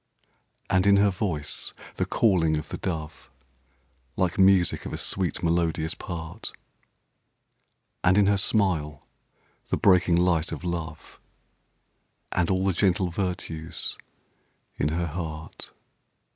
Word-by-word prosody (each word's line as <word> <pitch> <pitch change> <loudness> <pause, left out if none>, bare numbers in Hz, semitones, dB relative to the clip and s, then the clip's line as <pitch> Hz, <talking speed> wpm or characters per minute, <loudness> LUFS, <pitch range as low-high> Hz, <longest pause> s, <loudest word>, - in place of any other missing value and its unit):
And 95 +1 +2
in 100 0 +6
her 100 0 +4
voice, 90 -7 -2 0.2
the - - 0
calling 85 -8 +3
of 75 - -6
the - - -4
dove; 80 -6 -5 0.9
Like 95 +2 0
music 95 -3 +4
of - - -7
a - - -2
sweet, 90 -4 -1
melodious 85 -1 +1
part. 85 +2 -6 1.5
And 90 +2 +4
in 105 - +5
her 100 0 +3
smile, 85 -9 0 0.6
the - - +1
breaking 90 -3 +4
light 85 -2 +2
of - - -6
love; 85 -3 -5 1.1
And 90 -2 +1
all 95 0 +1
the 95 - +2
gentle 95 0 +2
virtues 85 -3 -3 0.8
in - - 0
her 85 +2 -1
heart. 80 -1 -6
85 Hz, 120 wpm, -26 LUFS, 80-95 Hz, 1.5 s, in